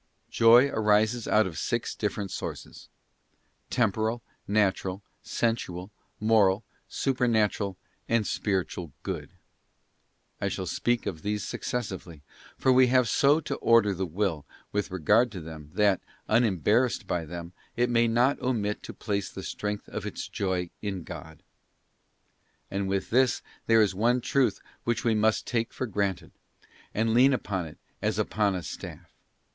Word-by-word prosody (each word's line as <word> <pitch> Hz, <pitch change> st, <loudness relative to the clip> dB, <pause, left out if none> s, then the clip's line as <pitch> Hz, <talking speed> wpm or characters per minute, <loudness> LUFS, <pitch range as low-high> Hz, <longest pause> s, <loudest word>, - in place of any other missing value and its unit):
Joy 120 Hz, +3 st, +7 dB
arises 110 Hz, 0 st, +2 dB
out 110 Hz, 0 st, +4 dB
of 80 Hz, -5 st, -5 dB
six -, -, -1 dB
different 100 Hz, -2 st, -3 dB
sources; -, -, -7 dB, 0.8 s
temporal, 110 Hz, 0 st, 0 dB, 0.2 s
natural, 100 Hz, -2 st, +1 dB, 0.2 s
sensual, 100 Hz, -5 st, -2 dB, 0.3 s
moral, 105 Hz, -2 st, +3 dB, 0.3 s
supernatural, 110 Hz, -7 st, +1 dB, 0.3 s
and 115 Hz, -2 st, +2 dB
spiritual 90 Hz, -7 st, -2 dB
good. -, -, -4 dB, 1.1 s
I -, -, +1 dB
shall -, -, -3 dB
speak 120 Hz, 0 st, 0 dB
of 80 Hz, -4 st, -4 dB
these 105 Hz, +1 st, -2 dB
successively, 95 Hz, -12 st, -4 dB, 0.3 s
for 130 Hz, -, +3 dB
we 130 Hz, 0 st, +6 dB
have 125 Hz, -1 st, +4 dB
so 140 Hz, +7 st, +4 dB
to -, -, -4 dB
order 115 Hz, -3 st, +4 dB
the 95 Hz, 0 st, -2 dB
Will 85 Hz, -3 st, -1 dB, 0.3 s
with 105 Hz, 0 st, -1 dB
regard 105 Hz, +7 st, +3 dB
to 95 Hz, -, -5 dB
them, 80 Hz, -2 st, -9 dB
that, 100 Hz, -2 st, +3 dB, 0.3 s
unembarrassed 110 Hz, -, +2 dB
by 90 Hz, -3 st, -1 dB
them, 85 Hz, +2 st, -7 dB, 0.2 s
it 120 Hz, +1 st, +2 dB
may 120 Hz, -1 st, +3 dB
not 120 Hz, +5 st, +2 dB
omit 105 Hz, -5 st, -1 dB
to -, -, -8 dB
place 100 Hz, -2 st, -2 dB
the 95 Hz, -, -8 dB
strength 105 Hz, +1 st, -4 dB
of -, -, -5 dB
its -, -, -5 dB
Joy 90 Hz, -3 st, -2 dB
in 95 Hz, -4 st, -3 dB
God. 80 Hz, 0 st, -10 dB, 1.3 s
And 100 Hz, 0 st, -1 dB
with 95 Hz, 0 st, -2 dB
this 130 Hz, +2 st, +3 dB, 0.2 s
there 115 Hz, -1 st, +6 dB
is 100 Hz, -, 0 dB
one 120 Hz, +6 st, +2 dB
truth 130 Hz, +1 st, +1 dB, 0.2 s
which 120 Hz, +1 st, -1 dB
we 115 Hz, -3 st, +3 dB
must 110 Hz, 0 st, +2 dB
take 115 Hz, -1 st, -1 dB
for 130 Hz, -, -3 dB
granted, 100 Hz, -4 st, -2 dB, 0.6 s
and 110 Hz, +1 st, +1 dB
lean 130 Hz, +4 st, +6 dB
upon 95 Hz, -8 st, -2 dB
it 75 Hz, -, -12 dB, 0.2 s
as -, -, 0 dB
upon 105 Hz, -2 st, +1 dB
a 90 Hz, -, -4 dB
staff. -, -, -8 dB
105 Hz, 145 wpm, -28 LUFS, 95-115 Hz, 1.3 s, Joy